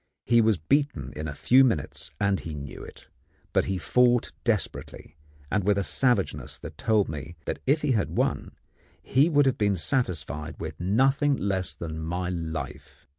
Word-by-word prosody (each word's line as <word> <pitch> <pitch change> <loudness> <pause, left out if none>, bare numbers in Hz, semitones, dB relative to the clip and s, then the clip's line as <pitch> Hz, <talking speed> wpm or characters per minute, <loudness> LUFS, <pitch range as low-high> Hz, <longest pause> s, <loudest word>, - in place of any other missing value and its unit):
He 120 -1 +5
was 110 -3 +3
beaten 110 - 0
in 75 +1 -4
a 70 - -5
few 130 - +5
minutes, 115 - -1
and 100 -2 +1
he 80 -2 -6
knew 70 -1 -8
it; - - -13 0.5
but - - +3
he 95 -1 -1
fought 120 +7 +3
desperately, 105 -8 -2 0.4
and 105 0 +1
with 100 +1 +2
a 100 - +1
savageness 125 +4 0
that 75 - -9
told 105 +3 +2
me 75 +2 -7
that - - -3
if 150 +3 +2
he 145 - +2
had 110 -6 0
won - - -1 0.5
he 140 +6 +3
would 145 -3 +4
have 135 - +1
been 100 -2 +2
satisfied 80 - -1
with 80 -1 -6
nothing 135 - +2
less 95 -2 -1
than 80 -1 -6
my 90 +3 -2
life. 75 -4 -6
95 Hz, 175 wpm, -26 LUFS, 80-125 Hz, 0.5 s, He